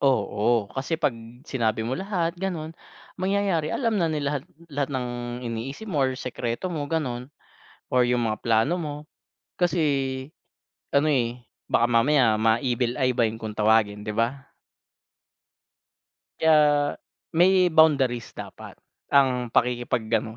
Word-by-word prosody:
Oo, 110 -4 +1
kasi 140 - -3
'pag 120 - +1 0.3
sinabi 115 -4 0
mo 120 +4 -2
lahat 180 -3 -2
gano'n, 165 -4 -4 0.4
mangyayari 190 -4 0
alam 230 -5 0
na 165 -4 +1
nila 145 -1 -1
lahat 135 - -7 0.2
lahat 145 -1 -2
ng 125 -2 -2 0.4
iniisip 135 - -5
mo 145 -8 +1
or 130 - 0
sikreto 125 +5 -4
mo 155 -5 -3
gano'n 140 -4 -3 0.6
or 125 - +5
yung 120 -1 +2
mga 110 -1 -2
plano 115 +7 +2
mo 150 -2 -4 0.6
kasi 175 -1 +1 1.1
ano, 140 +2 +2
eh, 125 -5 +1 0.3
baka 120 - +3
mamaya 120 0 +4
ma-"evil 120 +2 +1
eye" 130 -1 +2
ba 115 -2 +2
yun 110 - -7
kung 110 -1 -6
tawagin, 105 -1 +2
di 105 - -6
ba? 120 +6 -2 1.9
Kaya 150 -2 +4 0.4
may 180 +1 +4
boundaries 135 -7 +3
dapat - - -9 0.3
ang 130 -3 +3
pakikipaggano'n, 115 -2 0
130 Hz, 130 wpm, -25 LUFS, 115-155 Hz, 1.9 s, or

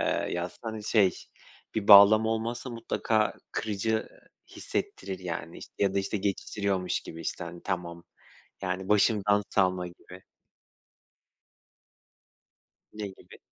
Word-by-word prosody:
ııı, - - 0
yazsa, 85 +1 -4
hani, 110 -2 -5
şey, 100 -6 +3 0.6
bir 110 -1 -2
bağlamı 105 +2 +9
olmazsa 115 +3 -3
mutlaka 115 -1 0 0.2
kırıcı 110 +1 -1 0.5
hissettirir 95 -1 -4
yani, 85 -2 -6
işte, - - -12
ya 100 -1 +1
da, - - +2
işte, 100 +2 -2
geçiştiriyormuş 100 -1 -1
gibi, 80 - -9
işte, 85 - -4
hani, 85 0 -9
tamam. 85 -2 -4 0.6
Yani 95 +1 -3
başımdan 105 -1 +3
savma 95 -2 +1
gibi. 90 +1 -14 2.7
Ne 105 -1 -5
gibi? 95 - -14
100 Hz, 115 wpm, -28 LUFS, 90-110 Hz, 2.7 s, bağlamı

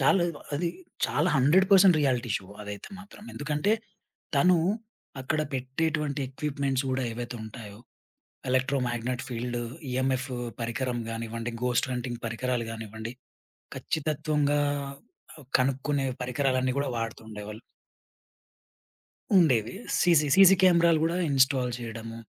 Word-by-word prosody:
చాలేవో, 175 -5 +2
అది 170 +4 0 0.4
చాలా 155 +5 +1
100% 185 +5 +6
reality 125 -4 +1
show 95 - -9 0.2
అదైతే 105 -1 -7
మాత్రం. 205 0 -13
ఎందుకంటే, 150 +8 0 0.6
తనూ 175 +5 +5 0.6
అక్కడ 155 +4 -1
పెట్టేటువంటి 145 +2 -1
ఎక్విప్‌మెంట్స్ 140 -1 -2
గూడా 130 0 0
ఏవైతే 120 +1 -5
ఉంటాయో, 110 -2 -9 0.7
ఎలక్ట్రోమాగ్నెట్ 125 -2 0
ఫీల్డు, 120 0 -3 0.3
ఇఎంఎఫ్ 130 +1 0 0.3
పరికరం 120 +2 -2
గానివ్వండి, 115 +1 -4
ఘోస్ట్ 125 +1 +1
హంటింగ్ 120 -1 -4
పరికరాలు 115 0 -2
గానివ్వండి, 110 +1 -6 0.6
ఖచ్చితత్వంగా 150 -1 0 0.7
ఆహ్, 150 -5 -14
కనుక్కునే 135 +1 0 0.2
పరికరాలన్నీ 130 0 0
గూడా 140 - 0
వాడుతూ 115 0 -4
ఉండేవాళ్ళు. 105 +1 -8 1.8
ఉండేవి 125 - +4 0.3
సీసీ 170 -4 +4
సీసీ 195 0 +8
కేమెరాలు 170 -3 +5
గూడా 165 +2 +1
ఇన్‌స్టాల్ 130 -2 +3
చెయడము. 115 -1 -7
130 Hz, 105 wpm, -28 LUFS, 120-150 Hz, 1.8 s, సీసీ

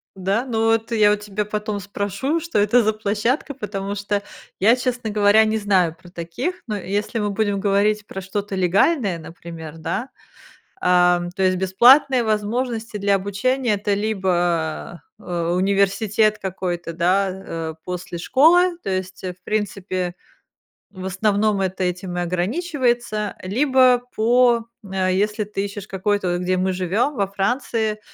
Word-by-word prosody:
Да? 195 +6 -1
Ну, 225 -2 +1
эт 225 +1 -1
я 210 -2 +5
у - - +3
тебя 210 0 -3
потом 210 0 -3
спрошу, 205 - -2
что 335 -4 -3
это 210 +4 +4
за 215 +1 +2
площадка, 220 +7 -1
потому 200 -4 -4
что 205 0 -2 0.4
я, 220 +5 +5
честно 245 -3 -2
говоря, 210 +1 +5
не 220 0 0
знаю 190 -6 +2
про 175 - -14
таких, 175 - -4
но 210 -1 -2
если 205 +4 -2
мы 205 -1 -1
будем 205 -1 0
говорить 205 +1 +1
про 195 - -6
что-то 200 +1 -4
легальное, 190 - +2
например, 165 -1 -9
да? 245 - -3 0.7
Ам, 180 -1 +3
то 190 +2 -4
есть 185 0 +3
бесплатные 245 +7 +5
возможности 220 +1 -2
для 200 0 +2
обучения- 210 +5 0
это 205 0 0
либо, 175 -6 -1 0.2
э, - - -18 0.3
университет 200 +3 +2
какой-то, 180 -3 -4
да, 185 +3 +2
э, 165 -4 -6
после 180 -1 -5
школы, 340 - +4
то 195 - -3
есть, 185 0 -4
в 180 0 -6
принципе, 185 -4 -2 0.8
в 185 -2 -9
основном 205 +2 +1
это 190 0 -1
этим 180 0 -3
и 175 - 0
ограничивается, 240 - -1
либо 255 +4 +3
по 235 +1 +4 0.2
если 195 +2 0
ты 200 -1 -3
ищешь 200 0 -8
какой-то, 190 -2 -1
где 180 +1 0
мы 185 +1 0
живем, 190 - 0
во 200 -4 0
Франции, 215 +1 -1
205 Hz, 145 wpm, -21 LUFS, 185-220 Hz, 0.8 s, я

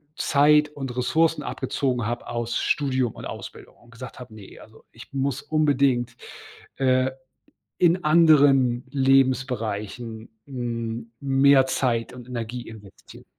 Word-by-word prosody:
Zeit 150 0 +3
und 135 -4 -7
Ressourcen 160 +6 +1
abgezogen 125 -5 -2
habe 120 +2 -4
aus 120 0 -3
Studium 130 -5 0
und - - -10
Ausbildung - - -9
und 120 - -22
gesagt 115 +1 -10
habe: 125 -3 -11
„Ne, 105 -3 -13
also 110 0 -17
ich 115 - -14
muss 135 -1 -2
unbedingt, 140 -5 +1 0.6
äh, 130 0 +2 0.7
in 175 +1 +2
anderen 145 -6 +4
Lebensbereichen, 125 -5 0 0.2
hm, 115 -3 -5
mehr 135 0 +4
Zeit 120 -3 -1
und 125 -1 -11
Energie 120 0 -6
investieren.“ 105 -3 -14
130 Hz, 120 wpm, -24 LUFS, 120-140 Hz, 0.7 s, anderen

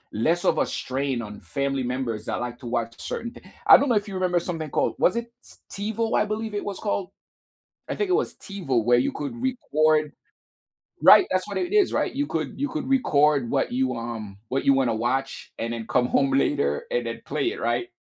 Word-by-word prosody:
less 165 +11 +1
of 160 - +3
a - - +2
strain 130 -1 -2
on 105 -2 -9
family 140 -1 -2
members 120 -4 -3
that - - -3
like 120 0 -5
to 130 - -10
watch 115 -1 -2
certain 235 0 -4
thi - - -14 0.3
I - - +11
don't 285 - +1
know 240 - +3
if 205 +1 0
you 195 - -6
remember 180 -1 +1
something 165 -3 -4
called, - - 0
was 185 - +3
it 235 0 -3 0.4
T 205 +2 -3
TiVo, 225 +1 0
I - - +3
believe 215 +1 -4
it 205 - -2
was 200 -2 -4
called? 200 -3 -2 0.8
I - - -2
think 410 -3 -2
it - - +3
was 405 +5 +1
TiVo 140 - -2
where 120 +1 +4
you 125 - +1
could 145 - -4
record 155 - +1 0.9
Right, 375 - +8
that's 185 0 0
what 200 - -3
it 360 +2 -2
is, 415 -3 +4
right? - - 0
You 285 +2 0
could 155 - -3
you 285 +2 -1
could 255 - -4
record 150 - +3
what - - 0
you, 130 0 0
um 115 -4 -6
what 135 - -1
you 140 - +5
wanna 130 -4 +2
watch 130 +4 -2
and 115 +1 -3
then 115 -1 -5
come 125 - +2
home 135 +2 +2
later 145 - +1
and - - 0
then - - -5
play - - 0
it, - - -8
right? 360 - -1
150 Hz, 225 wpm, -25 LUFS, -, 0.9 s, I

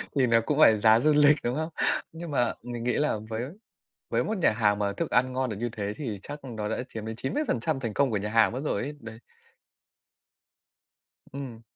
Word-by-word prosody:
Thì 130 -3 +3
nó 115 0 +4
cũng 150 0 0
phải 110 -8 +7
giá 110 +1 +6
du 155 +4 +3
lịch, 150 0 +6
đúng 120 +2 -1
không? 160 +1 -2 0.4
Nhưng 165 -1 -7
mà 125 -4 +1
mình 120 -1 -5
nghĩ 125 - +1
là 150 -7 +1
với 110 +1 -3 0.7
với - - +1
một 220 -2 -2
nhà 165 - +3
hàng 105 -2 +2
mà 100 -1 0
thức - - -3
ăn 130 +1 +2
ngon 130 -1 -1
được 105 - -4
như 120 +3 -2
thế 105 -2 -3
thì 110 -10 -5
chắc 145 +1 -8
nó 110 -5 -4
đã - - -2
chiếm 110 -1 -7
đến 110 0 -5
90% 135 - -1
thành 115 -4 -4
công 140 +1 +2
của 105 - 0
nhà 105 +2 -2
hàng 115 +1 +4
mất 130 - -3
rồi 100 - -1
ấy, 145 +4 -5
đấy. 110 -2 -9 2.2
Ừm. 130 -5 -7
120 Hz, 220 wpm, -27 LUFS, 110-145 Hz, 2.2 s, phải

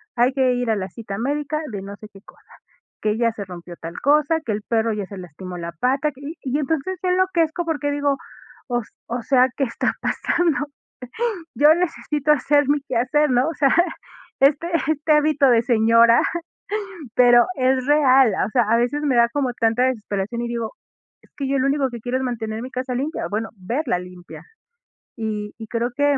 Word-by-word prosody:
Hay 245 +2 +3
que 260 -2 +2
ir 245 -1 -1
a - - +2
la 190 -2 -3
cita 210 -4 -7
médica 290 +5 -2
de 200 -2 -5
no 200 +1 -8
sé 215 - -11
qué 195 - -14
cosa, - - -20 0.5
que 215 0 0
ya 230 -1 +2
se 205 - -6
rompió 175 -1 -10
tal 165 +1 -8
cosa, 300 +3 +3
que 220 - -1
el 210 0 -2
perro 225 -1 0
ya 205 -2 -3
se 200 - -9
lastimó 180 +1 -8
la 170 0 -5
pata, 270 - 0
que, 275 +1 -17 0.2
y 275 +3 -1
entonces 320 +5 -2
se 370 - -2
enloquezco 355 -2 +1
porque 295 -3 -1
digo: 285 -1 0 0.5
"O 240 -1 0
s - - -17 0.2
o 240 +1 -3
sea, 255 -2 +4
¿qué 275 - +1
está 235 - -1
pasando?". 320 -4 0 0.9
Yo 300 +2 +6
necesito 300 -4 -1
hacer 290 +1 +2
mi 290 -1 +2
quehacer, 275 +3 +1
¿no? 250 +4 +3
O - - -4
sea, 275 -2 +3 0.7
este 290 +4 +4 0.2
este 310 0 0
hábito 300 -2 +4
de 230 -2 +5
señora, 230 0 +5 0.9
pero 240 -1 +6
es 260 0 +1
real, 270 -6 +5
o - - -7
sea, 240 +1 +3
a 225 +2 +2
veces 245 +5 0
me 265 -4 +2
da 235 0 +5
como 265 -2 -1
tanta 230 +2 +2
desesperación, 215 -2 -2
y 240 - -3
digo: 235 -2 -3 0.5
"Es - - -25
que 275 -2 -3
yo 275 0 +1
lo 260 - +1
único 275 -1 +1
que 235 - -7
quiero 250 +3 -2
es 260 - -3
mantener 225 -3 -3
mi 255 - -7
casa 255 0 -3
limpia, 285 +6 -2
bueno, 220 +2 -2
verla 195 - -1
limpia". 180 -1 -11 0.7
Y 210 -2 -4
y 220 - -9
creo 235 +2 -2
que 285 -1 +2
250 Hz, 195 wpm, -22 LUFS, 225-290 Hz, 0.9 s, Yo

